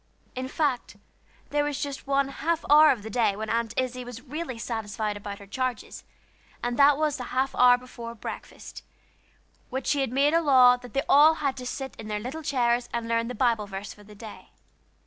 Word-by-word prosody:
In 255 0 -4
fact, 275 -3 -2 0.5
there 290 0 +1
was 290 -1 -3
just 280 -1 -6
one 275 0 +1
half 325 +4 -2
hour 305 +1 +7
of 230 -8 0
the 220 - -7
day 225 -3 +1
when 215 +1 -4
Aunt 230 0 -1
Izzie 255 -1 -2
was 245 0 -9
really 295 -2 -5
satisfied 220 -2 -3
about 205 0 -7
her 200 - -13
charges, 255 +3 -4 0.6
and 240 0 -1
that 280 0 +6
was 305 -1 0
the 250 - -6
half 260 +2 -1
hour 245 0 +6
before 235 -2 -9
breakfast, 220 - -9 0.9
when 265 0 -4
she 285 +2 +1
had 265 - -1
made 280 +4 +2
a 335 - +4
law 255 -5 +6
that 245 0 -12
they 275 - +1
were - - -12
all 305 +3 +6
to 270 -4 -3
sit 265 +1 -5
in 220 - -8
their 210 -1 -2
little 260 +9 -6
chairs 245 -4 0
and 235 -1 -3
learn 230 0 0
the 250 - -5
Bible 230 -5 +1
verse 200 +1 -7
for 210 - -17
the 210 0 -15
day. 215 +1 -11
250 Hz, 205 wpm, -26 LUFS, 230-280 Hz, 0.9 s, hour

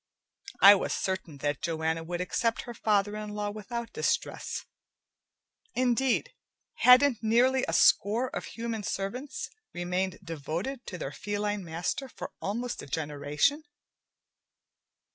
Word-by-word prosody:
I 200 +1 +12
was 200 - 0
certain 185 -6 -3
that 145 -1 0
Joanna 160 0 -1
would 175 +2 -3
accept 225 +5 0
her 240 - -7
father 210 -2 +1
in 210 -1 -5
law 205 0 -2
without 230 +3 -6
distress. 460 - -1 1.1
Indeed, 255 +1 +1 0.4
hadn't 250 -1 +6
nearly 250 +4 +3
a - - -2
score 235 +6 +4
of - - -3
human 230 -1 -4
servants 250 +11 -4 0.2
remained 180 +1 -1
devoted 170 - -4
to 180 - -5
their 135 - -4
feline 205 +2 -2
master 175 - -3
for - - -7
almost 235 +5 -3
a - - -10
generation? 150 - 0
205 Hz, 125 wpm, -29 LUFS, 175-240 Hz, 1.1 s, I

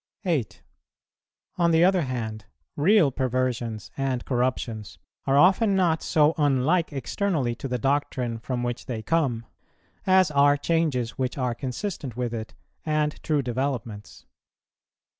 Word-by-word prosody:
8. 150 - -1 1.0
On 170 -1 +4
the 165 0 +4
other 185 -1 +3
hand, 115 -6 -4 0.3
real 165 -1 +4
perversions 125 -4 -2
and 135 -3 -2
corruptions 120 -4 -2 0.3
are 135 +1 +3
often 195 +6 +5
not 170 -4 +2
so 155 0 +3
unlike 145 +5 +2
externally 140 - -1
to 125 - -6
the 125 -1 -1
doctrine 130 -3 -1
from 125 +1 -3
which 120 0 -4
they 115 -3 -4
come, 135 -8 0 0.6
as 185 -3 +5
are 145 0 +4
changes 145 -7 -1
which 130 +1 -2
are 125 -3 0
consistent 130 - -5
with 120 -2 -2
it 110 -1 -6 0.3
and 155 -1 -1
true 150 -3 0
developments. 120 -4 -4
135 Hz, 130 wpm, -25 LUFS, 120-160 Hz, 1.0 s, often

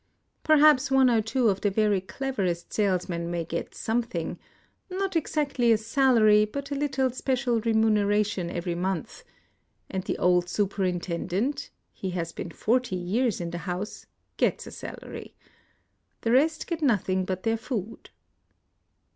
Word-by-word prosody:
" - - -48
Perhaps 305 -4 +5
one 265 -2 +5
or 225 -2 +3
two 230 +3 +1
of 195 -2 +1
the 205 - +2
very 205 -1 +2
cleverest 190 -6 -3
salesmen 180 -4 0
may 170 -1 -2
get - - -5
something, 225 -8 -2 0.3
— - - -43
not 380 0 -2
exactly 285 -6 +1
a 225 - +5
salary, 220 -2 +4
but 280 +7 -5
a - - 0
little 270 -2 0
special 250 -2 0
remuneration 210 -4 +2
every 175 0 -3
month; 180 -1 -3 0.7
and 190 -1 -2
the - - -2
old 180 0 +2
superintendent 190 - -1
— - - -48
(he 190 - -5
has 170 -2 -3
been 165 - -6
forty 235 +4 0
years 205 +6 0
in 170 -1 -4
the 170 - -4
house) 185 +4 -5
— - - -48
gets - - +1
a - - -9
salary. - - -9 0.9
The 230 - 0
rest 310 +6 +3
get 335 -2 -4
nothing 195 - +2
but 185 0 -4
their 225 0 +2
food." 225 -2 -5
215 Hz, 155 wpm, -27 LUFS, 185-260 Hz, 0.9 s, Perhaps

